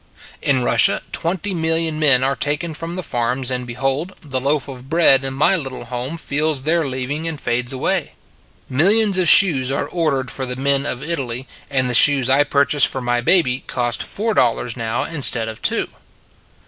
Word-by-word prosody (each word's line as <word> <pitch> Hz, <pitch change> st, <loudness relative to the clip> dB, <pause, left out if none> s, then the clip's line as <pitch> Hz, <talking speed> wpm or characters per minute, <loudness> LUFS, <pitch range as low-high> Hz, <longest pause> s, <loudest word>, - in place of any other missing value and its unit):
In 130 Hz, -3 st, 0 dB
Russia -, -, +2 dB
twenty 190 Hz, +4 st, -3 dB
million 160 Hz, -1 st, -2 dB
men 135 Hz, -4 st, +4 dB
are 135 Hz, +1 st, 0 dB
taken 150 Hz, +3 st, -3 dB
from 165 Hz, +3 st, -7 dB
the 185 Hz, -, -5 dB
farms; 125 Hz, 0 st, -2 dB
and, 125 Hz, -1 st, -4 dB
behold, 135 Hz, +9 st, -3 dB
the 130 Hz, -4 st, -4 dB
loaf 140 Hz, +1 st, -1 dB
of 130 Hz, -1 st, -10 dB
bread 160 Hz, -5 st, +4 dB
in 135 Hz, 0 st, -4 dB
my 150 Hz, +7 st, +3 dB
little 135 Hz, -7 st, -6 dB
home 125 Hz, +6 st, -6 dB
feels 150 Hz, -2 st, -1 dB
their 160 Hz, 0 st, 0 dB
leaving 135 Hz, +5 st, -4 dB
and 160 Hz, -3 st, -4 dB
fades 120 Hz, 0 st, -2 dB
away. 160 Hz, +5 st, -2 dB, 0.5 s
Millions 195 Hz, -, +2 dB
of 180 Hz, -, +1 dB
shoes 145 Hz, -9 st, +7 dB
are 140 Hz, -, -2 dB
ordered 140 Hz, -7 st, -2 dB
for 130 Hz, -1 st, -5 dB
the 125 Hz, -, -5 dB
men 140 Hz, +1 st, 0 dB
of 125 Hz, -, -4 dB
Italy: 135 Hz, -6 st, -4 dB, 0.2 s
and 130 Hz, -2 st, 0 dB
the 125 Hz, -, -2 dB
shoes 130 Hz, 0 st, +6 dB
I 140 Hz, +2 st, +4 dB
purchase 140 Hz, 0 st, +1 dB
for 130 Hz, -, +2 dB
my 120 Hz, -1 st, -2 dB
baby 130 Hz, -2 st, +2 dB
cost 120 Hz, -1 st, -1 dB
four 220 Hz, +2 st, -2 dB
dollars 120 Hz, -, 0 dB
now 115 Hz, -2 st, -3 dB
instead 130 Hz, -8 st, +1 dB
of 110 Hz, -1 st, -9 dB
two. -, -, +1 dB
140 Hz, 185 wpm, -18 LUFS, 125-160 Hz, 0.5 s, shoes